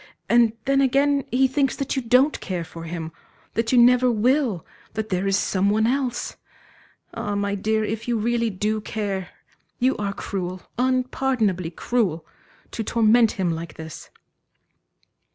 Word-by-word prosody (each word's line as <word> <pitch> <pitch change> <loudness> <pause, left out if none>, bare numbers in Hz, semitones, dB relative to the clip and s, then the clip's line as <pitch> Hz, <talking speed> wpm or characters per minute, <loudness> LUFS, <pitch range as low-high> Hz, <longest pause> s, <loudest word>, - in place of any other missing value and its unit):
And 235 -2 +4
then 275 0 +3
again 275 +1 +2
he 265 +2 +3
thinks 270 0 0
that 275 0 -3
you 265 - 0
don't 255 +5 +3
care 180 -3 -3
for 165 0 -9
him, 165 -1 -5 0.4
that 230 0 0
you 255 - +4
never 250 +1 +6
will, 235 - +1 0.3
that 220 0 -3
there 185 +1 0
is 195 0 +3
some 195 0 +1
one 215 +2 +2
else.... 255 0 -1 0.8
Ah, 205 0 -3
my 200 0 -1
dear, 215 +2 0
if 220 +2 -4
you 240 -1 +1
really 235 +1 0
do 215 +2 -1
care, 200 -4 -3 0.5
you 255 +2 +2
are 205 -1 -2
cruel, 185 -2 -5 0.2
unpardonably 255 -7 0
cruel, 175 -3 -1 0.5
to 225 - -3
torment 230 +1 +4
him 185 -3 -1
like 165 +1 -6
this." 160 -1 -9
220 Hz, 150 wpm, -23 LUFS, 195-250 Hz, 0.8 s, never